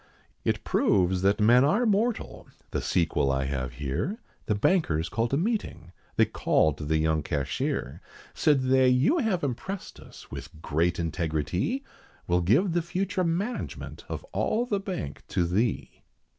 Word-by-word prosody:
It - - 0
proves 90 -1 +2
that 100 +2 +2
men 120 +4 +6
are 205 - +3
mortal, 220 +2 0 0.2
the - - -1
sequel 80 -5 +1
I 65 0 0
have 65 -2 -3
here, 70 - -2 0.3
The 105 - +2
bankers 95 - +1
called 115 +4 -1
a 135 - +2
meeting, 170 - -2 0.2
they - - +5
called 80 -2 +1
the 80 +1 +2
young 80 0 +1
cashier. 70 -1 -2 0.3
Said 145 -4 +3
they, 130 0 +4
"You 130 - +3
have 215 - 0
impressed 160 +9 -4
us - - -14
with 80 - -8
great 85 +3 0
integritee, 85 - -1 0.4
We'll 90 0 +2
give 140 - +3
the 175 - +2
future 185 +2 -1
management 185 +8 -3
of - - -4
all 235 +3 +1
the 205 -5 -1
Bank 185 - -5
to 90 - 0
thee." 100 +6 -1
115 Hz, 150 wpm, -27 LUFS, -, 0.4 s, men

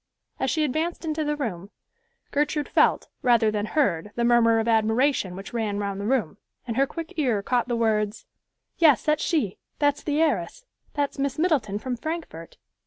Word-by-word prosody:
As 265 - 0
she 310 +2 +1
advanced 315 +5 -2
into 310 0 -1
the 295 0 -1
room, 205 - -4 0.6
Gertrude 295 +1 0
felt, - - +2
rather 235 -3 +4
than 210 0 -2
heard 210 - 0
the 235 - 0
murmur 235 -1 +4
of 225 0 0
admiration 225 -2 +2
which 195 +5 -9
ran 220 -3 -1
round 200 -1 -3
the 205 - -3
room, 220 -7 0 0.3
and 230 -2 -4
her 275 +2 +3
quick 330 +2 -7
ear 240 -9 +1
caught 245 +1 0
the 240 - -1
words, 215 -2 0 0.5
"Yes, 310 -6 +5
that's 305 -1 +1
she; 280 - 0 0.2
that's 290 -1 +1
the 295 0 -1
heiress; 325 +10 0 0.3
that's 285 -1 -1
Miss 275 0 -1
Middleton 290 - +1
from 250 +3 -3
Frankfort." 310 - -6
245 Hz, 175 wpm, -25 LUFS, 215-295 Hz, 0.6 s, Yes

